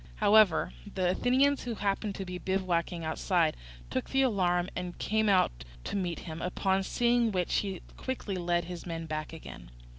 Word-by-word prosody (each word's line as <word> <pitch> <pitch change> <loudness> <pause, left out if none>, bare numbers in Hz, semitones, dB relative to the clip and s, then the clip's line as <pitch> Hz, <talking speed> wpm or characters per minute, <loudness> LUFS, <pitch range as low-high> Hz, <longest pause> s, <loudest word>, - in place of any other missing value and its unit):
However, 200 - +4 0.2
the 180 -1 +2
Athenians 265 +7 +3
who 235 -2 -3
happened 200 0 -1
to 195 - -5
be 180 0 -5
bivouacking 180 -3 -1
outside 160 0 +1 0.4
took 130 - -2
the 270 0 +3
alarm 180 -7 +2
and 180 -1 -4
came 220 0 +1
out 120 - +2 0.2
to - - -4
meet 180 -4 -2
him, 160 -1 -7
upon 190 +1 +1
seeing 235 +3 +2
which 180 -3 0
he 195 -3 -2
quickly 250 -6 -3
led 175 -1 +1
his 175 0 -7
men 165 -1 -4
back 155 -1 -4
again. 150 - -10
185 Hz, 170 wpm, -30 LUFS, 170-205 Hz, 0.4 s, However